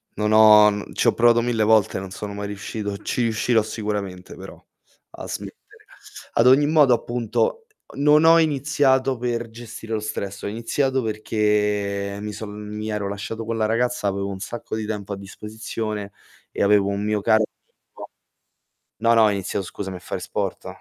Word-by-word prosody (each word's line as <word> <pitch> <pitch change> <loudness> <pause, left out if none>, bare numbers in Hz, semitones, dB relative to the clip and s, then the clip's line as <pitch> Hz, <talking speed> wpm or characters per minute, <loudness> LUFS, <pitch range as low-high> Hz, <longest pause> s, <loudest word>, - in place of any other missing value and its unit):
non 105 +1 0
ho 105 -1 +8
mhmm, 105 0 -6
ci - - 0
ho - - +5
provato 120 0 +4
mille 115 -2 0
volte, 110 -3 +3
non 95 -1 -8
sono 100 +1 -6
mai 100 0 -5
riuscito. 105 0 -5
Ci 125 - -3
riuscirò 115 0 +2
sicuramente 105 -4 -5
però - - -11 0.5
a - - -9
smettere. - - -6 0.8
Ad 115 - +4
ogni 140 +3 +6
modo, 150 -4 +5
appunto, 125 - -1 0.3
non 150 +2 +4
ho 165 +1 +7
iniziato 135 -3 +2
per 120 -1 -3
gestire 110 -1 -8
lo 110 - 0
stress. 100 -2 -5
Ho - - -2
iniziato 130 +5 -1
perché 105 -2 -1
mi 105 0 -5
son 105 0 -7 0.2
mi 110 +1 -4
ero 105 -2 -2
lasciato 100 +3 -5
con 115 0 -3
la 110 - +1
ragazza, 120 0 0
avevo 100 0 -2
un 95 -1 -6
sacco 115 +3 -6
di 110 -1 -3
tempo 105 -2 -4
a 100 - -5
disposizione 105 +1 -6 0.4
e - - -4
avevo 100 -1 +4
un 100 0 -2
mio 105 0 0
caro 110 +2 +3
amico - - -16 0.9
no, 115 +2 +3
no, 115 - +5
ho 105 - +4
iniziato 100 0 -3
scusami 95 0 -6
a - - -7
fare - - -5
sport. - - -4
110 Hz, 175 wpm, -22 LUFS, 100-120 Hz, 0.9 s, ho